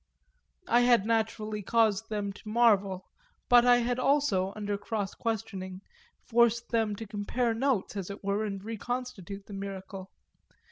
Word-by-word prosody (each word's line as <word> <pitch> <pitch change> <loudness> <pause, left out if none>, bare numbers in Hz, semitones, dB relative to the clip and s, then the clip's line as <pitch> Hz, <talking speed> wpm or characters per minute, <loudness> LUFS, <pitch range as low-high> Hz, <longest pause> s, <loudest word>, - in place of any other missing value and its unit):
I 240 - +4
had 245 -4 +4
naturally 220 -1 -1
caused 220 0 +2
them 205 -2 -2
to 210 - -11
marvel, 205 -5 +3 0.4
but 245 0 +7
I 245 0 +7
had 245 +1 0
also, 255 -9 +2
under 205 -1 -2
cross 205 0 -3
questioning, 195 -5 -4 0.4
forced 235 0 +2
them 225 -3 +1
to 225 - -7
compare 225 +3 -1
notes, 235 -4 0
as 195 -2 -4
it 200 +1 -8
were, 200 +2 0
and 195 -2 -4
reconstitute 225 -4 -5
the 205 - -10
miracle. 195 -1 -7
215 Hz, 145 wpm, -29 LUFS, 200-235 Hz, 0.4 s, but